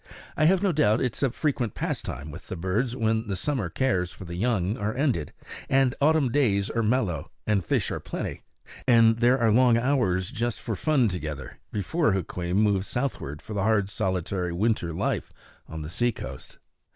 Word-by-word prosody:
I 155 Hz, -, +3 dB
have 185 Hz, +4 st, +4 dB
no 195 Hz, -, +3 dB
doubt 140 Hz, -8 st, +3 dB
it 125 Hz, -3 st, -1 dB
is -, -, -7 dB
a 135 Hz, -, +3 dB
frequent 125 Hz, -, -1 dB
pastime 70 Hz, +4 st, -4 dB
with -, -, -10 dB
the -, -, -5 dB
birds 100 Hz, +8 st, -1 dB
when 110 Hz, -2 st, 0 dB
the 100 Hz, -, -2 dB
summer 110 Hz, -1 st, -1 dB
cares 90 Hz, -5 st, 0 dB
for 90 Hz, +1 st, -10 dB
the 85 Hz, -, -7 dB
young 100 Hz, 0 st, 0 dB
are 105 Hz, +3 st, -2 dB
ended, 125 Hz, -, 0 dB, 0.4 s
and 135 Hz, -2 st, +3 dB
autumn 150 Hz, -3 st, +3 dB
days 105 Hz, -8 st, +2 dB
are 115 Hz, -, 0 dB
mellow, 110 Hz, -, 0 dB, 0.2 s
and 105 Hz, -3 st, +1 dB
fish -, -, 0 dB
are -, -, -2 dB
plenty, -, -, -5 dB, 0.5 s
and 115 Hz, -2 st, +6 dB
there 125 Hz, +2 st, +4 dB
are 115 Hz, -3 st, +3 dB
long 120 Hz, +1 st, +5 dB
hours 115 Hz, -8 st, +1 dB
just 120 Hz, 0 st, -2 dB
for 110 Hz, -, -3 dB
fun 135 Hz, +2 st, +2 dB
together, 75 Hz, -7 st, -5 dB
before 110 Hz, -, +1 dB
Hukweem 90 Hz, -1 st, -2 dB
moves 100 Hz, -2 st, +2 dB
southward 110 Hz, -, -3 dB
for 110 Hz, -, -7 dB
the 100 Hz, -, -1 dB
hard 105 Hz, -1 st, +2 dB
solitary 90 Hz, -1 st, -1 dB
winter 95 Hz, -1 st, 0 dB
life 80 Hz, -, -2 dB, 0.4 s
on 80 Hz, -1 st, -6 dB
the 75 Hz, -, -6 dB
seacoast. 120 Hz, +6 st, -3 dB
110 Hz, 185 wpm, -26 LUFS, 90-125 Hz, 0.5 s, and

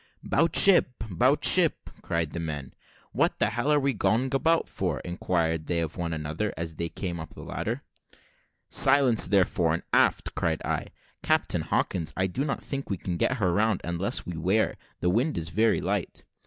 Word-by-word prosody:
"'Bout 165 Hz, +4 st, +1 dB
ship 175 Hz, -10 st, +5 dB
'bout 85 Hz, -, +2 dB
ship!" -, -, +3 dB
cried 85 Hz, -2 st, -2 dB
the 85 Hz, -, -5 dB
men. 75 Hz, -5 st, -5 dB, 0.4 s
"What -, -, +1 dB
the 105 Hz, -, +1 dB
hell 120 Hz, +6 st, -1 dB
are 150 Hz, -, +4 dB
we 140 Hz, -1 st, 0 dB
going 125 Hz, +4 st, 0 dB
about 165 Hz, +4 st, +2 dB
for?" 85 Hz, -8 st, -3 dB
inquired 85 Hz, -2 st, -2 dB
they 85 Hz, -, 0 dB
of 80 Hz, -1 st, -3 dB
one 85 Hz, -2 st, -3 dB
another, 80 Hz, +6 st, -3 dB
as 85 Hz, -1 st, -4 dB
they 85 Hz, +1 st, -4 dB
came 85 Hz, -2 st, -5 dB
up 80 Hz, 0 st, -9 dB
the -, -, -10 dB
ladder. -, -, -4 dB, 0.8 s
"Silence 135 Hz, -4 st, +5 dB
there, 100 Hz, -3 st, +4 dB
fore 80 Hz, -3 st, 0 dB
and 85 Hz, -, -6 dB
aft!" -, -, +2 dB
cried -, -, -1 dB
I. -, -, -2 dB, 0.3 s
"Captain -, -, +1 dB
Hawkins, 80 Hz, -4 st, -1 dB
I 95 Hz, -, +1 dB
do 95 Hz, +9 st, -2 dB
not 140 Hz, -2 st, -3 dB
think 140 Hz, -1 st, -5 dB
we 100 Hz, -, -2 dB
can 90 Hz, 0 st, -4 dB
get 130 Hz, +9 st, 0 dB
her 95 Hz, -6 st, +1 dB
round, 105 Hz, +1 st, +1 dB
unless 85 Hz, +3 st, -2 dB
we 90 Hz, -, -6 dB
wear 95 Hz, +7 st, +1 dB, 0.3 s
the 90 Hz, -, +2 dB
wind 125 Hz, -, 0 dB
is 85 Hz, -1 st, -3 dB
very 110 Hz, +5 st, +2 dB
light." -, -, -3 dB
90 Hz, 190 wpm, -27 LUFS, 85-120 Hz, 0.8 s, ship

